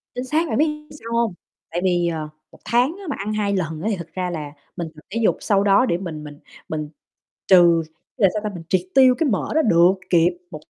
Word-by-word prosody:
Chính 250 - -3
xác 315 +5 0
bạn - - -1
biết 300 0 +1
sao 230 -6 -8
hông? 230 -5 +1 0.4
Tại 175 +1 -2
vì, 175 -2 +2
ờ, 155 -2 -3 0.2
1 - - -18
tháng 250 +8 +2
á 400 - -11
mà - - -2
ăn 210 +2 -3
2 205 -1 0
lần 160 -3 -3
á 210 - -2
thì - - 0
thật 170 -1 -8
ra 185 -1 -2
là 150 -4 -5 0.2
mình 170 -3 -4
tập 155 - -14
thể 230 +4 -3
dục - - +3
sau 200 -1 +2
đó 200 +6 +4
để 170 - 0
mình 160 -5 -6
mình 145 -1 -10 0.3
mình 155 -1 -4 0.6
trừ, 175 -3 +6 0.4
là 195 - +5
sao 215 - -2
ta, 210 - -1
mình 165 - -8
triệt 185 -2 +2
tiêu 260 -2 +6
cái 320 -5 +1
mỡ 205 - -1
đó 315 - +5
được 175 - +5 0.2
kịp, 175 0 +3
1 155 - -7
190 Hz, 245 wpm, -22 LUFS, 170-235 Hz, 0.6 s, trừ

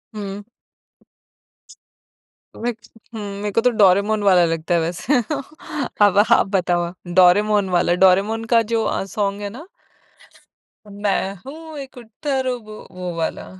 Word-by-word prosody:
हुँ। 200 -1 -6 2.2
Wick 235 0 -3 0.4
हुँ, 220 - -6 0.2
मेरे 210 0 -2
को 230 - +2
तो 250 - +4
डोरेमोन 205 0 +3
वाला 185 -3 +5
लगता 165 +1 -2
है 170 - +3
वैसे। 180 - 0 0.8
अब 200 -1 +2
आप - - +5
बताओ, 175 -2 0 0.3
डोरेमोन 205 +2 +4
वाला 175 -1 +2
डोरेमोन 200 +5 +2
का 230 - +6
जो 225 -1 +2
अ, - - -1
सॉन्ग 200 +1 -2
है 205 - -4
ना। 260 - -11 1.2
मैं 200 -1 -2
हूँ 315 +2 -9
एक 270 -2 -10
उत्तर 260 +3 -3
वो, 215 -7 -6
वाला। 165 - -3
205 Hz, 130 wpm, -20 LUFS, 185-230 Hz, 2.2 s, का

